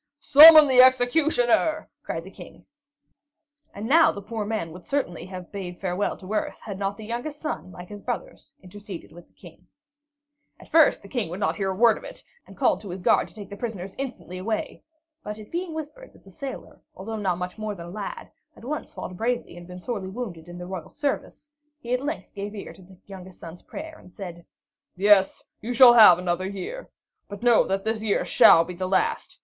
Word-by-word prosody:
"Summon 310 Hz, +2 st, +10 dB
the 260 Hz, -2 st, +6 dB
executioner!" 260 Hz, +3 st, +3 dB
cried -, -, -5 dB
the -, -, -12 dB
King. -, -, -14 dB, 1.1 s
And 205 Hz, -, -7 dB
now 320 Hz, +7 st, +5 dB
the -, -, -8 dB
poor 215 Hz, +1 st, -5 dB
man 210 Hz, -7 st, -3 dB
would 175 Hz, +2 st, -13 dB
certainly 180 Hz, -, -3 dB
have 185 Hz, -2 st, -9 dB
bade 180 Hz, -3 st, -7 dB
farewell 190 Hz, +1 st, -2 dB
to 195 Hz, +2 st, -8 dB
earth, 215 Hz, -, -2 dB
had 200 Hz, -3 st, -7 dB
not 200 Hz, 0 st, -2 dB
the 220 Hz, -, -9 dB
youngest 245 Hz, +7 st, -5 dB
son, 305 Hz, -11 st, -5 dB
like 180 Hz, 0 st, -11 dB
his 205 Hz, -1 st, -9 dB
brothers, -, -, -6 dB
interceded 190 Hz, -3 st, -10 dB
with 175 Hz, +1 st, -15 dB
the -, -, -37 dB
King. 175 Hz, 0 st, -16 dB, 0.9 s
At -, -, -16 dB
first 320 Hz, -8 st, +4 dB
the -, -, -11 dB
King 230 Hz, -6 st, -3 dB
would 180 Hz, +3 st, -6 dB, 0.2 s
hear 195 Hz, -2 st, -2 dB
not 190 Hz, -, -3 dB
a -, -, -10 dB
word 230 Hz, -2 st, +5 dB
of -, -, -18 dB
it, -, -, -10 dB, 0.2 s
and -, -, -15 dB
called 220 Hz, -8 st, +1 dB
to 205 Hz, -, -10 dB
his 180 Hz, +1 st, -7 dB
guard -, -, +3 dB
to -, -, -20 dB
take 205 Hz, -2 st, -10 dB
the -, -, -6 dB
prisoners 200 Hz, -4 st, -6 dB
instantly 245 Hz, -9 st, -6 dB
away; 215 Hz, +3 st, -4 dB, 0.4 s
but 210 Hz, 0 st, -6 dB
it 215 Hz, -1 st, -13 dB
being 350 Hz, 0 st, -3 dB
whispered 320 Hz, +12 st, -8 dB
that -, -, -21 dB
the -, -, -17 dB
sailor, 275 Hz, -3 st, -9 dB
although 220 Hz, +4 st, -6 dB
not 190 Hz, -5 st, -1 dB
much 180 Hz, +3 st, -6 dB
more 215 Hz, -1 st, -4 dB
than 170 Hz, -2 st, -9 dB
a -, -, -10 dB
lad, 200 Hz, 0 st, -7 dB, 0.2 s
had -, -, -17 dB
once 300 Hz, +4 st, -5 dB
fought 180 Hz, -, -7 dB
bravely 235 Hz, 0 st, -2 dB
and 175 Hz, 0 st, -12 dB
been 180 Hz, 0 st, -10 dB
sorely 195 Hz, -1 st, -5 dB
wounded 190 Hz, -7 st, -7 dB
in 175 Hz, -, -9 dB
the 180 Hz, -, -7 dB
royal 180 Hz, -3 st, -7 dB
service, 290 Hz, 0 st, -4 dB, 0.3 s
he 240 Hz, -3 st, -4 dB
at 250 Hz, -, 0 dB
length 295 Hz, +3 st, -5 dB
gave 205 Hz, +1 st, -6 dB
ear 200 Hz, -, -8 dB
to -, -, -17 dB
the 185 Hz, 0 st, -17 dB
youngest 190 Hz, -2 st, -12 dB
son's 165 Hz, +1 st, -11 dB
prayer 315 Hz, +1 st, -9 dB
and 180 Hz, -, -17 dB
said: 175 Hz, -3 st, -10 dB, 0.5 s
"Yes, 195 Hz, 0 st, +3 dB, 0.2 s
you 240 Hz, +3 st, -4 dB
shall 245 Hz, 0 st, +8 dB
have 215 Hz, -7 st, +9 dB
another 180 Hz, +1 st, -2 dB
year. 200 Hz, -, -7 dB, 0.4 s
But 205 Hz, +3 st, -9 dB
know 240 Hz, -2 st, +4 dB
that 195 Hz, 0 st, -1 dB
this 220 Hz, 0 st, -2 dB
year 215 Hz, -2 st, 0 dB
shall 165 Hz, -, +6 dB
be 180 Hz, -, -7 dB
the 185 Hz, +1 st, -4 dB
last. 185 Hz, 0 st, -1 dB
205 Hz, 215 wpm, -24 LUFS, 185-245 Hz, 1.1 s, Summon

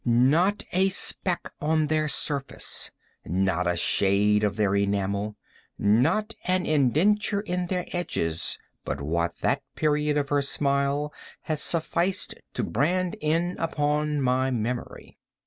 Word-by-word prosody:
Not 145 Hz, -, +3 dB
a 190 Hz, +1 st, +3 dB
speck 180 Hz, -1 st, +1 dB
on 155 Hz, +1 st, +2 dB
their 155 Hz, 0 st, +1 dB
surface—not 95 Hz, -, -1 dB
a 85 Hz, -, +1 dB
shade 100 Hz, +4 st, +2 dB
on 105 Hz, -1 st, +1 dB
their 100 Hz, -2 st, +1 dB
enamel—not 105 Hz, -, 0 dB
an 185 Hz, 0 st, +1 dB
indenture 175 Hz, -, +2 dB
in 180 Hz, -3 st, -2 dB
their 180 Hz, -1 st, -2 dB
edges—but 85 Hz, -, -3 dB
what 85 Hz, +4 st, -1 dB
that -, -, +1 dB
period 150 Hz, -1 st, +1 dB
of 140 Hz, -1 st, -1 dB
her 145 Hz, -1 st, +2 dB
smile 140 Hz, +1 st, 0 dB, 0.3 s
had 155 Hz, -2 st, -3 dB
sufficed 170 Hz, +3 st, -1 dB, 0.2 s
to -, -, -1 dB
brand 175 Hz, +9 st, 0 dB
in 165 Hz, +4 st, 0 dB
upon 150 Hz, -2 st, 0 dB
my 130 Hz, 0 st, +2 dB
memory. 120 Hz, 0 st, -4 dB
145 Hz, 115 wpm, -26 LUFS, 105-170 Hz, 0.3 s, Not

